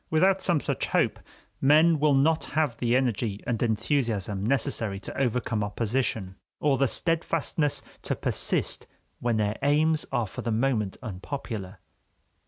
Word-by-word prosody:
Without 190 +4 +3
some 170 -4 +2
such - - -2
hope, - - +1 0.4
men 155 +3 +5
will 150 -1 +4
not 155 +4 +3
have 150 -7 +2
the 120 +1 +1
energy 115 -5 0
and 115 -3 -1
enthusiasm 110 -4 0
necessary 110 -4 0
to - - -8
overcome 120 -4 0
opposition, 105 -2 -2 0.2
or 140 -3 +2
the 135 - +4
steadfastness 160 0 0 0.2
to - - -2
persist - - 0 0.3
when 120 -1 0
their 105 0 0
aims 155 +2 +2
are 120 -4 +1
for 95 - -7
the 115 - -2
moment 110 -4 0
unpopular. 105 -2 -6
125 Hz, 140 wpm, -27 LUFS, 110-145 Hz, 0.4 s, men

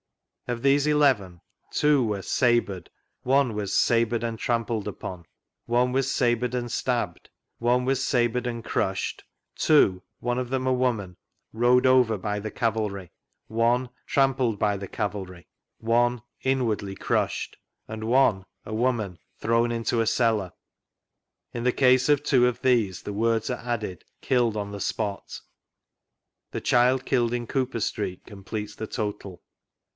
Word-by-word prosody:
Of 120 -1 -3
these 140 +1 +4
eleven: 130 - +2 0.3
two 150 -3 +3
were 105 -4 -2
"sabred;" 120 -9 +1 0.3
one 130 -2 +2
was 105 -2 -3
"sabred 115 +1 +2
and 115 -1 -2
trampled 115 -3 -1
upon;" 90 -4 -7 0.4
one 120 +1 +2
was 135 0 +1
sabred 120 -1 +1
and 120 -1 -2
stabbed;" - - -2 0.3
one 125 +1 +2
"sabred 125 -2 0
and 115 -1 -4
crushed;" - - -2 0.3
two 100 -12 +4 0.2
(one 120 0 -1
of 125 -1 -3
them 130 0 -1
a 130 - +3
woman) 115 -8 -1 0.4
"rode 120 +3 +3
over 125 -4 +4
by 105 +2 -3
the 110 +1 -5
cavalry;" 105 -6 -2 0.4
one 120 +3 +1 0.2
"trampled 130 -5 +2
by 105 -2 +2
the 100 0 -6
cavalry;" 95 -4 -5 0.3
one 120 +1 +1 0.2
"inwardly 115 -7 -1
crushed;" - - -1 0.3
and 110 0 -6
one 115 -5 +3 0.2
(a 110 - -6
woman) 110 -6 -1
" - - -46
thrown 115 +1 +2
into 115 0 0
a 115 - 0
cellar." 115 -5 +1 1.0
In 120 - -4
the 125 - +3
case 130 +1 +4
of 145 -1 +3
two 125 -4 +4
of 125 0 -2
these 115 -9 +1
the 105 - -5
words 115 +1 0
are 125 - -3
added 110 -7 -3
" - - -48
Idlled 120 -4 +2
on 100 -1 -4
the 100 -1 -6
spot." 100 +1 -3 1.1
The - - -4
child 125 +1 +3
killed 120 -3 +1
in 120 -1 -2
Cooper 130 -2 -1
Street 90 -3 -3
completes 105 +1 -6
the 110 - -5
total. 105 -4 -5
115 Hz, 150 wpm, -26 LUFS, 105-125 Hz, 1.1 s, these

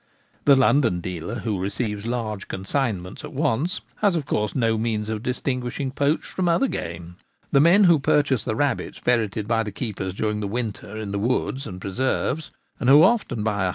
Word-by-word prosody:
The 140 - +7
London 130 -7 +3
dealer, 90 +6 -5
who 105 -3 -2
receives 105 +2 -3
large 110 -4 -3
consignments 95 -3 -3
at - - -8
once, 150 +4 0 0.2
has 200 -4 +2
of 155 -4 -1
course 105 -4 -1
no 115 -3 +2
means 110 -1 -1
of 110 -1 -3
distinguishing 125 +1 -2
poached 145 +3 0
from 180 -2 -1
other 265 +11 +3
game. 85 - -6 0.3
The 140 - +5
men 170 +8 +6
who 170 -5 +6
purchase 140 -4 +2
the 110 - -2
rabbits 145 +3 -1
ferreted 110 -4 0
by 115 0 +2
the 105 -2 -4
keepers 95 -4 -4
during 105 0 -1
the 105 - -2
winter 110 -1 -4
in 105 -2 -5
the 100 - -2
woods 130 +4 -1
and 90 -3 -7
preserves, 130 +9 -1 0.3
and 125 - +1
who 145 +3 +8
often 185 - +2
buy 105 -3 0
ioo - - +1
115 Hz, 190 wpm, -24 LUFS, 105-140 Hz, 0.3 s, who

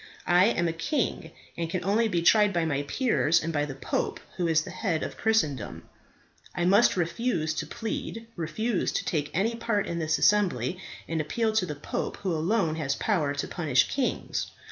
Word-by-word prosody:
I 180 +1 +5
am 175 -7 +1
a 165 - -1
king, 185 - -2 0.3
and 165 -1 -3
can 180 0 -3
only 220 +4 +3
be 175 -5 0
tried 210 +2 +5
by 170 -1 +1
my 145 -3 0
peers 170 - +2
and 165 +1 -2
by 145 -1 +1
the 135 -2 -6
pope, 135 - -2 0.2
who 175 -2 0
is 160 -1 +3
the 185 - -8
head 180 -4 -1
of - - -5
Christendom. 155 - 0 0.7
I 175 - 0
might 200 +3 +5
refuse 170 -2 0
to 155 - -4
plead, 225 0 -5
refuse 185 +6 -1
to - - -1
take 145 -3 -1
any 200 +9 +1
part 230 -3 -1
in 170 - -3
this 160 0 +1
assembly, 185 - +2 0.3
and 165 -1 -1
appeal 220 +8 0
to 205 -4 +1
the 150 - -4
pope, 145 - -4
who 185 -3 -2
alone 165 0 +1
has 135 -4 -1
power 155 -10 0
to 140 - -2
punish 145 -8 +2
kings. 270 -3 -1
175 Hz, 190 wpm, -27 LUFS, 155-210 Hz, 0.7 s, I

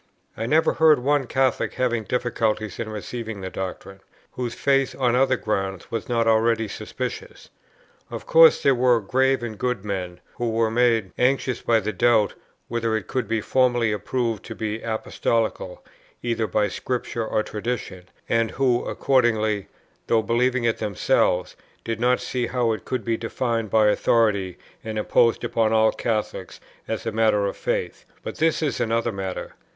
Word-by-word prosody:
I 115 - -3
never 155 +5 +3
heard 160 -1 +5
of 125 - -8
one 145 -1 +1
Catholic 130 0 0
having 120 -3 0
difficulties 110 -4 -1
in 115 -2 -3
receiving 110 0 -6
the 95 0 -5
doctrine, 95 +1 -6 0.3
whose 120 -2 -4
faith 135 -1 +1
on 125 -2 +2
other 130 0 +3
grounds 95 -4 -3
was 115 0 -4
not 115 -1 +1
already 115 0 +2
suspicious. 100 - -7 0.6
Of - - -7
course 165 0 +6
there 140 - +5
were 125 -1 +3
grave 130 +5 +1
and 110 -3 -6
good 125 -5 -2
men, 90 -3 -4 0.2
who 120 -1 -1
were 115 0 +1
made 115 -4 +2
anxious 125 -1 +1
by 115 -1 +2
the 110 +2 -3
doubt 110 +1 +3 0.3
whether 115 -1 -1
it 105 - -6
could 125 -4 -2
be 110 0 0
formally 120 -3 +2
proved 115 -2 -2
to - - -7
be 110 0 -3
Apostolical 110 -3 -2 0.4
either 115 -2 -1
by 105 -1 +1
Scripture 120 +2 -3
or 110 - 0
tradition, 105 -5 -5 0.2
and 115 -1 +1
who 125 -1 +1
accordingly, 110 -6 +1 0.4
though 115 -1 +2
believing 125 +2 +1
it 115 -1 0
themselves, 95 -3 +1 0.3
did 115 -1 -3
not 125 +1 +2
see 125 -2 -2
how 120 -3 0
it 110 -4 -4
could 130 - -3
be 115 -1 0
defined 115 -1 -2
by 110 0 +4
authority 105 -4 +2 0.3
and 110 -1 -5
imposed 115 +2 +2
upon 110 -1 +1
all 110 0 +4
Catholics 110 -2 -3 0.3
as 110 0 -4
a 115 - -1
matter 110 -2 +2
of 100 - -2
faith; - - -3 0.2
but - - -6
this 160 0 +1
is 145 - -1
another 115 +1 0
matter. 95 -2 -5
115 Hz, 165 wpm, -23 LUFS, 110-125 Hz, 0.6 s, course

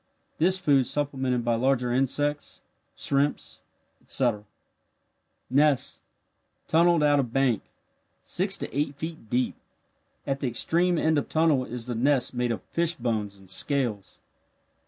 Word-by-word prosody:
This 185 +4 +3
food 145 -8 +2
supplemented 135 -4 -1
by 120 - +1
larger 125 0 0
insects, 145 +3 -1 0.3
shrimps, 140 +1 -1 0.4
etc. 115 -5 -1 1.0
Nest 140 +1 +1 0.6
tunnelled 170 -1 +3
out 145 -1 +3
of 125 -4 -2
bank 130 -4 +1 0.6
six - - +2
to - - -6
eight 145 0 -1
feet 155 -6 -8
deep 125 +2 0 0.7
at 135 0 -2
the 135 - -2
extreme 170 +9 +2
end 160 -1 +2
of - - -7
tunnel 155 -5 +2
is 120 -1 -3
the 125 - -3
nest 130 +3 +1
made 125 -1 -1
of 110 -5 -4
fish 170 0 -1
bones 110 -4 -3
and 95 - -18
scales. 110 +1 +2
135 Hz, 135 wpm, -26 LUFS, 120-150 Hz, 1.0 s, This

